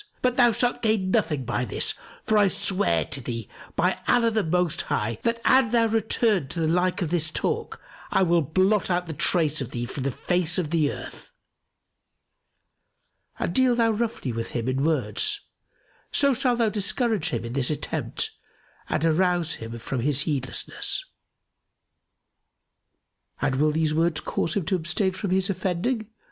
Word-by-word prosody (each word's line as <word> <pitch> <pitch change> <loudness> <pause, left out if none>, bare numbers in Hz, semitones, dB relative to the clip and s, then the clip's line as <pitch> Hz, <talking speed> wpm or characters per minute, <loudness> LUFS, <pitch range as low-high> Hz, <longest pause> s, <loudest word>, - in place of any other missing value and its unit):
But 250 -1 +2
thou 245 -2 +5
shalt 240 +2 0
gain 215 -4 +1
nothing 160 - +1
by 120 +1 -1
this; 120 - -1 0.3
for 220 - +1
I 205 -1 +5
swear 180 - +1
to 135 +1 -3
thee, 115 -3 -5 0.3
by - - +1
Allah 235 -2 +4
the 220 -1 +1
Most 175 0 +1
High, 110 +1 -2
that 230 0 0
an 260 -3 +5
thou 230 0 +3
return 220 - +1
to 170 - -4
the 160 - +1
like 180 +3 +1
of 165 - -3
this 160 -3 0
talk, - - -2 0.3
I - - +3
will 170 -1 +3
blot 185 +8 +2
out 180 0 +1
the 165 - -5
trace 155 0 +2
of 130 - -4
thee 120 -1 -3
from 135 +3 -5
the 135 - 0
face 175 +5 0
of 170 -3 -2
earth!' 155 -4 -2 2.1
And 170 - -2
deal 255 +2 +4
thou 230 -1 +3
roughly 220 - -2
with 115 0 -3
him 115 +1 -3
in 130 +1 0
words, 285 - +1 0.7
so 280 -1 +4
shalt 245 0 +1
thou 230 -2 +2
discourage 210 - 0
him 150 - -3
in 115 - -5
this 135 -1 0
attempt 150 -1 -2 0.6
and 155 - 0
arouse 175 0 +2
him 115 +1 -6
from 120 +3 -4
his 140 +2 +1
heedlessness." 135 -4 -1 2.3
"And 135 0 0
will 150 +2 +3
these 155 0 +1
words 165 0 +1
cause 165 - -2
him 195 -5 -1
to 190 - +1
abstain 180 +4 0
from 190 +1 -4
his 190 +1 +1
offending?" 195 +5 -1
175 Hz, 165 wpm, -25 LUFS, 145-215 Hz, 2.3 s, thou